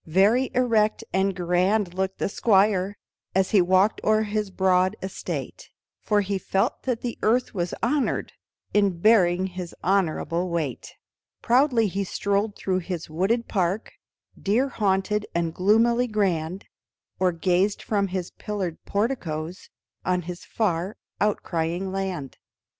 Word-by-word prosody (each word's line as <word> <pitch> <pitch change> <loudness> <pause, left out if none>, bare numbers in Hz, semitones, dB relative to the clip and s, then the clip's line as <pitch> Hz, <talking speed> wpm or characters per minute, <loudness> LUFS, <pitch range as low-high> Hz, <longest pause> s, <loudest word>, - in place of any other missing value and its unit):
Very 205 +10 +3
erect 225 -4 +2
and 190 0 +1
grand 180 +2 +1
looked 190 +1 -2
the - - -1
Squire 200 -2 +2 0.4
As 190 -1 +2
he 200 - +6
walked 185 +4 +3
o'er 215 0 +3
his 210 -1 -2
broad 185 +1 +2
estate, 190 - -6 0.3
For 210 -1 +2
he 195 0 -2
felt 195 +1 0
that 240 -2 0
the 240 -2 -4
earth 240 +3 +2
was 175 -3 -2
honored 270 +3 0 0.4
In 200 -4 +2
bearing 185 -2 +4
his 180 -2 -6
honorable 180 -1 0
weight; 155 -8 -3 0.5
Proudly 245 -2 +4
he 200 0 -1
strolled 200 +2 -1
through 185 -1 -1
his 170 -3 -5
wooded 205 +9 0
park 190 +2 -1 0.5
Deer 235 +7 +2
haunted 210 -1 0
and 170 -1 0
gloomily 230 +6 +3
grand, 190 -4 -1 0.5
Or 185 -1 +3
gazed 180 +4 +1
from 200 -2 0
his 185 -1 -4
pillared 195 -6 -4
porticoes 185 -7 -2 0.3
On 180 -1 0
his 175 +1 -7
far 190 -2 -1 0.2
outlying 180 -2 -1
land. 190 -8 -4
195 Hz, 130 wpm, -25 LUFS, 180-215 Hz, 0.5 s, he